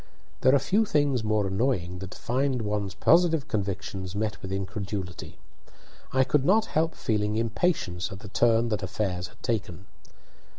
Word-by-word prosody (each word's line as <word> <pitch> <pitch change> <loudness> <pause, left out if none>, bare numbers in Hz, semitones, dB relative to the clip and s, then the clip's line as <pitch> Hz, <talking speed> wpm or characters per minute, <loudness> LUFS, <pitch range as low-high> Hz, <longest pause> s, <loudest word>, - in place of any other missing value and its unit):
There 130 +2 +5
are - - +7
few 200 +11 +2
things 145 - +1
more 110 -1 +1
annoying 95 -3 -1
than 95 0 -6
to - - -10
find 130 0 0
one's 105 -3 -2
positive 165 - +4
convictions 95 -3 -3
met 105 -3 -2
with 95 - -6
incredulity. 95 -2 -5 0.7
I 130 0 +4
could 135 +1 +2
not 215 +8 +4
help 160 +1 +1
feeling 105 -2 0
impatience 110 - 0
at 95 0 -8
the - - -9
turn 115 +2 +3
that 105 -1 -1
affairs 95 -1 -2
had 110 - -22
taken. 100 -5 -2
110 Hz, 160 wpm, -27 LUFS, 95-130 Hz, 0.7 s, are